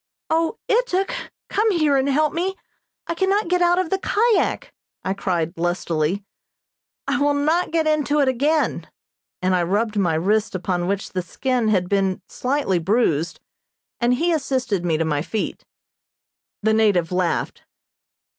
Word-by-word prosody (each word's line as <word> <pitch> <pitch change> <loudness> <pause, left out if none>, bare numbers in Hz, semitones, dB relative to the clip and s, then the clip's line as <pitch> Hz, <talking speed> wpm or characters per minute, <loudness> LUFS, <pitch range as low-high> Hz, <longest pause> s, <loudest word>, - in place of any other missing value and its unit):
"O, 330 +7 +1
Ituk, 445 -2 +1 0.3
come 435 +2 +1
here 310 -7 +2
and 270 +1 +2
help 300 +2 +2
me! 370 +3 -1 0.5
I - - -2
cannot 385 +2 +1
get 360 0 +2
out 350 0 +4
of 370 -3 -1
the 385 - +1
kyak," 445 +3 +1 0.3
I 190 - -1
cried 175 -4 -1
lustily. 175 +1 -1 0.8
"I 285 +1 0
will 290 0 +3
not 315 +5 +1
get 325 -1 +1
into 300 -1 +1
it 280 - +3
again," 290 +5 +1 0.5
and 185 0 +3
I 180 - +2
rubbed 210 +5 0
my 170 -5 +2
wrist 205 +6 +1
upon 180 -1 -1
which 200 0 -2
the 185 - -1
skin 250 +5 -1
had 185 -4 +2
been 195 -1 0
slightly 255 -8 0
bruised, 170 -4 0 0.6
and 245 0 +3
he 340 +7 +1
assisted 255 - -1
me 165 -3 +1
to 165 - 0
my 150 -2 0
feet. 215 +6 -4 1.0
The 220 +1 +3
native 205 -7 +2
laughed. 180 -1 -1
240 Hz, 155 wpm, -22 LUFS, -, 1.0 s, out